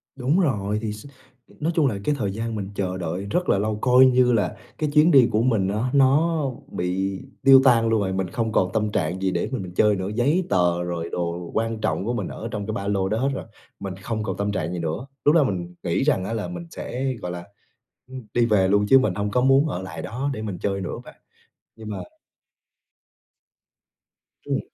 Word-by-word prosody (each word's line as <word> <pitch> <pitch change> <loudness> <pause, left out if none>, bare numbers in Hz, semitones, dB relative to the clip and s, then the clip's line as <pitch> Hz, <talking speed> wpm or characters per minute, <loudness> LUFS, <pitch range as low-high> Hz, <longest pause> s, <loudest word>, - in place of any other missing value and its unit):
Đúng 135 +6 +1
rồi, 105 - 0
thì 110 -2 -3
s 105 +4 -11 0.5
nói 155 +3 0
chung 155 -4 +3
là 110 - -1
cái 150 - +1
thời 100 -7 -1
gian 115 +3 -4
mình 100 -2 -4
chờ 95 -2 -2
đợi 90 +2 -4
rất 180 0 0
là - - +4
lâu, 105 +1 -1
coi 125 0 +6
như 125 -1 +4
là 105 -5 0 0.2
cái 155 - -1
chuyến 155 +3 +5
đi 135 -6 +7
của 105 - +2
mình 115 -6 +2
á, 110 +6 -1
nó 150 +4 +3 0.3
bị 95 +2 -2 0.2
tiêu 135 0 +8
tan 115 -3 +4
luôn 110 -2 +2
rồi, 95 -1 -1
mình 95 -1 -1
không 115 +1 -2
còn 95 -3 +1
tâm 105 -1 0
trạng 90 0 -1
gì 95 -1 +1
để - - -1
mà - - -6
mình 130 - -2
mình 90 -1 -9
chơi 105 +2 +3
nữa. 95 0 -3
Giấy 145 +10 +2
tờ 90 -2 +2
rồi 85 -1 -4
đồ 85 0 -4
quan 115 -1 -1
trọng 110 -2 -1
của 120 - -1
mình 120 - -2
ở 115 - -6
trong 105 -1 -4
cái 110 - -2
ba 100 -1 -4
lô 95 -2 0
đó 110 - 0
hết 135 +4 +1
rồi, - - -5 0.3
mình 95 -1 -5
không 110 +2 -4
còn 95 -4 -3
tâm 100 0 -1
trạng 90 -3 -2
gì 90 - -3
nữa. 80 +8 -3 0.2
Lúc 150 - +5
đó 160 - +6
mình 90 -7 -3
nghĩ 85 +7 0
rằng 135 -10 +2
á, 115 - -3
là 110 -2 -3
mình 175 -1 -7
sẽ, 130 +1 -3
gọi 90 - -4
là, 90 -1 -6 0.6
ừm, 130 0 -8
đi 120 -1 +3
về 105 -5 +3
luôn 100 +1 +3
chứ 135 - +8
mình 120 -8 +1
hông 105 +1 -2
có 125 - +2
muốn 135 +3 +4
ở 90 - -3
lại 95 - -7
đó 130 +5 -3
để 110 - -5
mình 105 -4 -4
chơi 100 -1 -1
nữa, 90 - -4
bạn. - - -13 0.6
Nhưng 110 -1 -8
mà 105 - -4 2.5
Ừm. - - 0
105 Hz, 235 wpm, -23 LUFS, 95-130 Hz, 2.5 s, tiêu